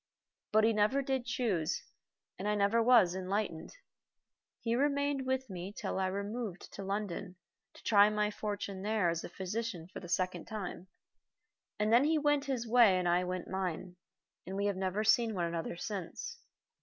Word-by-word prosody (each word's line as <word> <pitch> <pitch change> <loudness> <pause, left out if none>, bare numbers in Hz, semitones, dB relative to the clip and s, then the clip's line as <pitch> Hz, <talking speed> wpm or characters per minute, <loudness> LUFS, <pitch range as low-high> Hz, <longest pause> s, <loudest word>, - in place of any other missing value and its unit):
But 215 0 +5
he 225 +1 +4
never 215 +7 +2
did 265 -2 -1
choose, 195 -10 0 0.6
and 195 - -3
I 210 - +2
was 220 -1 +5
never 190 0 -4
enlightened. 185 -4 -2 0.9
He 230 - -1
remained 280 0 +1
with 260 0 0
me 185 -1 -6
till 205 - -3
I 190 - +1
removed 200 +1 -4
to 200 - -6
London 195 -2 -3 0.4
to - - -15
try 205 -1 +6
my 210 0 0
fortune 205 -2 -4
there 210 -3 +1
as 165 0 -2
a - - -6
physician 190 -1 -4
for - - -5
the 175 - -10
second 185 -1 -1
time, 195 -4 -6 0.9
and 210 +1 +1
then 245 +4 +6
he 315 +1 +3
went 290 -1 +2
his 255 -4 -2
way 225 -5 +6
and 180 -1 0
I 175 +1 +3
went 180 0 -4
mine, 185 -1 -3 0.5
and 190 - -4
we 200 +1 0
have 200 -1 +1
never 190 +2 -1
seen 225 0 +3
one 175 -2 0
another 170 0 -3
since. 190 -2 -5
205 Hz, 175 wpm, -33 LUFS, 185-230 Hz, 0.9 s, try